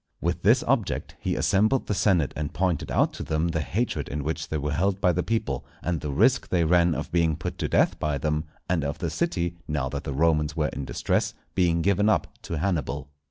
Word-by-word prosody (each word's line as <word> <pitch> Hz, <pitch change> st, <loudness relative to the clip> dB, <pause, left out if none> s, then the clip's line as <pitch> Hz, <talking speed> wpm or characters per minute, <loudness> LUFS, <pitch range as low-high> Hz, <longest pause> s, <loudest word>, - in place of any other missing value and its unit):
With -, -, -1 dB
this -, -, +4 dB
object -, -, -1 dB
he -, -, -1 dB
assembled 110 Hz, +7 st, +2 dB
the -, -, -1 dB
Senate 90 Hz, -7 st, +2 dB
and 75 Hz, 0 st, -4 dB
pointed 90 Hz, -4 st, 0 dB
out -, -, +2 dB
to -, -, -6 dB
them 80 Hz, +2 st, 0 dB
the 80 Hz, -1 st, -1 dB
hatred 110 Hz, -, -2 dB
in 75 Hz, 0 st, -3 dB
which 80 Hz, +2 st, -3 dB
they 80 Hz, -, -1 dB
were 75 Hz, 0 st, -2 dB
held 95 Hz, +5 st, +1 dB
by 90 Hz, -, +4 dB
the 90 Hz, -, 0 dB
people, 90 Hz, -, -1 dB, 0.2 s
and 85 Hz, -3 st, -1 dB
the 75 Hz, -, -3 dB
risk 70 Hz, -, +3 dB
they 85 Hz, -2 st, +2 dB
ran 85 Hz, 0 st, +4 dB
of -, -, -4 dB
being 85 Hz, -2 st, +2 dB
put 80 Hz, -, -5 dB
to -, -, 0 dB
death -, -, +2 dB
by 75 Hz, -2 st, 0 dB
them, 75 Hz, +2 st, -1 dB, 0.2 s
and 85 Hz, -4 st, +1 dB
of 70 Hz, 0 st, -2 dB
the 85 Hz, -3 st, -3 dB
city, 85 Hz, -, -1 dB
now 75 Hz, -3 st, -1 dB
that 70 Hz, +1 st, -4 dB
the 70 Hz, -, -4 dB
Romans 75 Hz, 0 st, +2 dB
were 75 Hz, -2 st, +1 dB
in 70 Hz, +1 st, -5 dB
distress, -, -, -1 dB, 0.2 s
being 85 Hz, -3 st, +2 dB
given 100 Hz, +3 st, +3 dB
up -, -, +3 dB, 0.2 s
to 85 Hz, -, -4 dB
Hannibal. 75 Hz, -5 st, -2 dB
80 Hz, 225 wpm, -26 LUFS, 75-90 Hz, 0.2 s, this